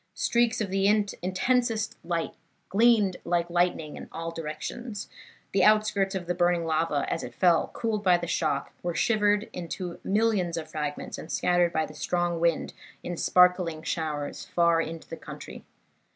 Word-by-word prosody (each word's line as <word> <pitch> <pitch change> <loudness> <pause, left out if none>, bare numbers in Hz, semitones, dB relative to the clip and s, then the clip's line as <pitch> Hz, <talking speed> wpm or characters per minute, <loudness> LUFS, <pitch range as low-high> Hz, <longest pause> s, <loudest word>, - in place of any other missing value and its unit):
Streaks 235 -1 +2
of 200 -3 -2
the 195 0 +2
intensest 215 +3 +1
light 170 -1 -2 0.4
glanced 210 -2 +4
like 170 0 0
lightning 175 -3 0
in - - -9
all 165 0 -5
directions; 165 +8 -6 0.4
the 195 - +3
outskirts 210 -2 +3
of 185 -2 -3
the 175 - -1
burning 175 -1 +2
lava 155 -2 0
as - - -2
it 120 -1 -8
fell, 175 +2 +3
cooled 220 -3 -2
by 180 -2 +5
the 175 - -4
shock, 170 - -1
were 175 -1 -3
shivered 210 -2 +2
into 175 0 -5
millions 200 -5 +1
of 155 -1 -6
fragments, 150 -1 -4
and 155 - -8
scattered 175 -1 +2
by 160 -2 0
the - - -11
strong 175 -1 -1
wind 170 -1 +1 0.3
in 175 - -4
sparkling 180 -2 +3
showers 150 -4 -3
far 170 -1 +3
into 165 0 -6
the - - -6
country. - - -9
175 Hz, 160 wpm, -27 LUFS, 165-205 Hz, 0.4 s, by